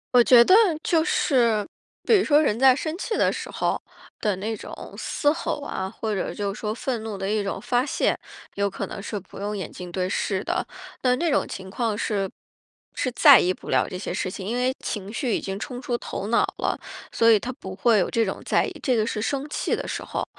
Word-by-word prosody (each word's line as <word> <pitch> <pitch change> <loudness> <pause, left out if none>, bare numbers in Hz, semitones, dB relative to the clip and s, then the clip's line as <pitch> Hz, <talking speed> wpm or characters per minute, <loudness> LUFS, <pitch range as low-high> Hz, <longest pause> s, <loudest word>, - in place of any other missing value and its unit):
我 245 - +8
觉 235 -1 +7
得 - - +5 0.3
就 325 -1 +2
是， 235 - +2 0.4
比 455 - +5
如 385 - +2
说 295 0 +4
人 225 -8 +1
在 265 +1 +7
生 315 +5 -3
气 440 +3 -2
的 - - +3
时 - - -6
候 - - 0 0.4
的 210 -2 +1
那 215 +4 -3
种 - - -10 0.3
嘶 290 - 0
吼 320 - -3
啊， 190 -9 -4
或 215 0 -3
者 190 - -2
就 200 -1 -2
说 210 +1 -3
愤 235 -1 -3
怒 220 -2 -5
的 195 +1 -3
一 210 0 +1
种 195 - -3
发 245 0 +1
泄， - - +1 0.4
有 200 0 0
可 195 - -5
能 200 - -7
是 210 0 -4
不 190 - -13
用 205 +1 -3
眼 185 -5 -5
睛 180 -1 -9
对 185 +1 -1
视 190 0 -1
的。 - - -1 0.4
但 250 -1 +2
那 340 0 +1
种 295 - +2
情 190 0 -8
况 220 +1 -1
是 200 -3 -1 0.7
是 255 - -1
在 280 +2 +8
意 185 - +2
不 - - -12
了 - - +2
这 185 - -5
些 185 - -4
事 185 - -2
情， 190 0 -6
因 230 - -1
为 250 +1 +1
情 200 -2 -5
绪 240 0 -1
已 - - -2
经 195 0 -4
冲 250 +3 -6
出 245 -2 -1
头 200 - -5
脑 230 +2 +3
了， - - -1 0.3
所 230 - +4
以 225 - +7
他 240 +5 -4
不 190 -8 -9
会 220 +2 +4
有 - - +1
这 230 - +2
种 195 - -3
在 - - +3
意， 390 - -5
这 255 -4 +1
个 220 -2 +2
是 215 -1 -2
生 275 +5 -1
气 - - -1
的 - - -5
时 - - -4
候。 - - -3
220 Hz, 255 characters per minute, -24 LUFS, 200-255 Hz, 0.7 s, 我